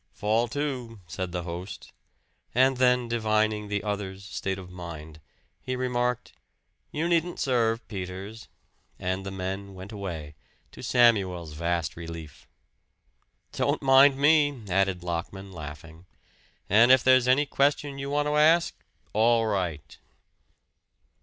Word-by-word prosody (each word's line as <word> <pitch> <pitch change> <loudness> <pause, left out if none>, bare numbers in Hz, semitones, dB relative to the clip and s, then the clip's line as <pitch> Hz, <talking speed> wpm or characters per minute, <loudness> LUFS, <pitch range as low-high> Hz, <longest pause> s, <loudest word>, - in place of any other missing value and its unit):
"Fall 110 +3 +1
to," 125 -4 -4
said 90 +2 -5
the 90 -1 -3
host; 90 +3 -7 0.6
and 130 +1 +4
then 125 -1 +3
divining 110 -2 0
the 100 0 -2
other's 100 -2 -4
state 95 -2 -3
of 90 -1 -10
mind, 80 -3 -9 0.4
he 130 - -3
remarked, 125 -1 -1 0.6
"You 160 +3 -1
needn't 170 0 0
serve, 115 -3 0
Peters," 95 +2 -7 0.5
and 95 +1 -3
the 95 - -5
men 95 +1 -5
went 95 +3 -9
away, 85 -8 -6 0.4
to - - -12
Samuel's 95 -10 +2
vast 85 +1 -2
relief. 80 -3 -9 1.0
"Don't - - -1
mind 135 +1 +6
me," 145 -3 +3
added 95 -1 +1
Lockman 90 +3 -5
laughing. 80 +1 -10 0.6
"And 115 +5 +6
if 130 -1 +6
there's 130 -1 +5
any 135 +4 +4
question 140 0 0
you 140 0 -4
want 145 +1 0
to 150 0 +1
ask, 165 +3 +4 0.4
all 115 +1 +3
right." 90 -9 -3
105 Hz, 125 wpm, -27 LUFS, 90-130 Hz, 1.0 s, mind